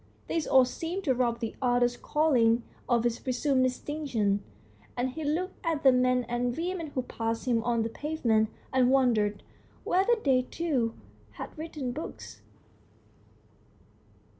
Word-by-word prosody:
This 325 Hz, -2 st, -1 dB
all 260 Hz, -1 st, +6 dB
seemed 335 Hz, +9 st, -4 dB
to 275 Hz, -7 st, +2 dB
rob 240 Hz, -1 st, 0 dB
the 225 Hz, -, -3 dB
author's 245 Hz, -1 st, +2 dB
calling 245 Hz, -6 st, +2 dB, 0.3 s
of 240 Hz, -1 st, +2 dB
its 240 Hz, -1 st, 0 dB
presumed 260 Hz, +1 st, +1 dB
distinction, 250 Hz, -6 st, -1 dB, 0.5 s
and 250 Hz, +1 st, 0 dB
he 315 Hz, +4 st, -6 dB
looked 345 Hz, +6 st, -2 dB
at 325 Hz, -4 st, -1 dB
the 265 Hz, -, +8 dB
men 250 Hz, 0 st, +3 dB
and 240 Hz, +1 st, -1 dB
women 345 Hz, 0 st, -2 dB
who 255 Hz, -, 0 dB
passed 225 Hz, -1 st, -3 dB
him 235 Hz, -2 st, +2 dB
on 235 Hz, -2 st, +1 dB
the 225 Hz, -, -2 dB
pavement, 230 Hz, -6 st, 0 dB, 0.2 s
and 255 Hz, -1 st, +4 dB
wondered 225 Hz, -6 st, +2 dB, 0.4 s
whether 390 Hz, +6 st, +3 dB
they 260 Hz, -2 st, +4 dB
too 255 Hz, -5 st, -1 dB, 0.4 s
had -, -, -8 dB
written 305 Hz, -5 st, -5 dB
books. 305 Hz, +6 st, -8 dB
255 Hz, 140 wpm, -29 LUFS, 235-300 Hz, 0.5 s, the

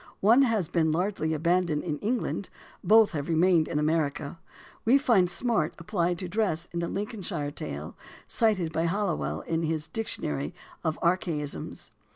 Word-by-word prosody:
One 230 Hz, +7 st, +6 dB
has 225 Hz, -, +2 dB
been 160 Hz, -2 st, +1 dB
largely 175 Hz, -1 st, 0 dB
abandoned 170 Hz, -1 st, +1 dB
in 150 Hz, -4 st, -3 dB
England, 220 Hz, -3 st, -2 dB, 0.3 s
both 220 Hz, 0 st, +6 dB
have 150 Hz, -2 st, -4 dB
remained 170 Hz, 0 st, +4 dB
in -, -, -2 dB
America. 150 Hz, 0 st, 0 dB, 0.4 s
We 245 Hz, +5 st, +5 dB
find 230 Hz, -10 st, +3 dB
"smart" 195 Hz, -4 st, 0 dB
applied 175 Hz, -1 st, -1 dB
to 185 Hz, -, -5 dB
dress 175 Hz, -4 st, 0 dB
in 170 Hz, -, -1 dB
a 170 Hz, -, -1 dB
Lincolnshire 190 Hz, -8 st, -3 dB
Tale, 75 Hz, -, -6 dB, 0.3 s
cited 190 Hz, -8 st, +1 dB
by 165 Hz, +1 st, +1 dB
Halliwell 195 Hz, -2 st, -1 dB
in 165 Hz, 0 st, -2 dB
his 160 Hz, -1 st, -1 dB
Dictionary 75 Hz, -, -2 dB, 0.3 s
of 155 Hz, -, -1 dB
Archaisms. 170 Hz, -4 st, -2 dB
170 Hz, 150 wpm, -28 LUFS, 155-205 Hz, 0.4 s, One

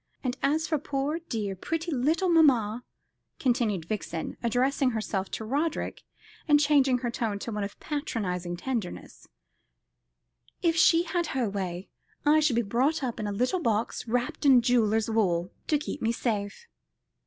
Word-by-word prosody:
And 250 Hz, -1 st, -1 dB
as 310 Hz, +3 st, +1 dB
for 310 Hz, -2 st, 0 dB
poor 285 Hz, +3 st, -2 dB
dear, 220 Hz, -, -4 dB
pretty 325 Hz, -, -3 dB
little 310 Hz, +7 st, +1 dB
mamma," 250 Hz, -9 st, +4 dB, 0.5 s
continued 225 Hz, -, 0 dB
Vixen, 170 Hz, -4 st, -4 dB
addressing 255 Hz, +3 st, +1 dB
herself 215 Hz, -4 st, -2 dB
to 220 Hz, -, -5 dB
Roderick, 290 Hz, +7 st, -2 dB, 0.5 s
and 295 Hz, -1 st, +6 dB
changing 280 Hz, -3 st, +4 dB
her 240 Hz, -, 0 dB
tone 225 Hz, -3 st, -2 dB
to 230 Hz, -, -6 dB
one 210 Hz, -1 st, -2 dB
of 200 Hz, -, -6 dB
patronising 185 Hz, -, -3 dB
tenderness, 230 Hz, -3 st, -5 dB, 1.4 s
"if 335 Hz, -2 st, +3 dB
she 330 Hz, +1 st, +5 dB
had 345 Hz, 0 st, -1 dB
her 245 Hz, -3 st, +1 dB
way, 190 Hz, -2 st, -4 dB, 0.4 s
I 300 Hz, +1 st, +5 dB
should 300 Hz, -6 st, +2 dB
be 235 Hz, -, +2 dB
brought 260 Hz, +9 st, +1 dB
up 245 Hz, -3 st, -3 dB
in 215 Hz, -, -2 dB
a -, -, -2 dB
little 250 Hz, -, 0 dB
box 225 Hz, -1 st, -1 dB
wrapped 245 Hz, +8 st, -1 dB
in 260 Hz, -4 st, +6 dB
jeweller's 225 Hz, -3 st, +2 dB
wool, 185 Hz, -6 st, +1 dB, 0.2 s
to 300 Hz, -, +3 dB
keep 295 Hz, 0 st, -6 dB
me 225 Hz, -, +1 dB
safe. 220 Hz, -, -3 dB
245 Hz, 155 wpm, -28 LUFS, 210-295 Hz, 1.4 s, and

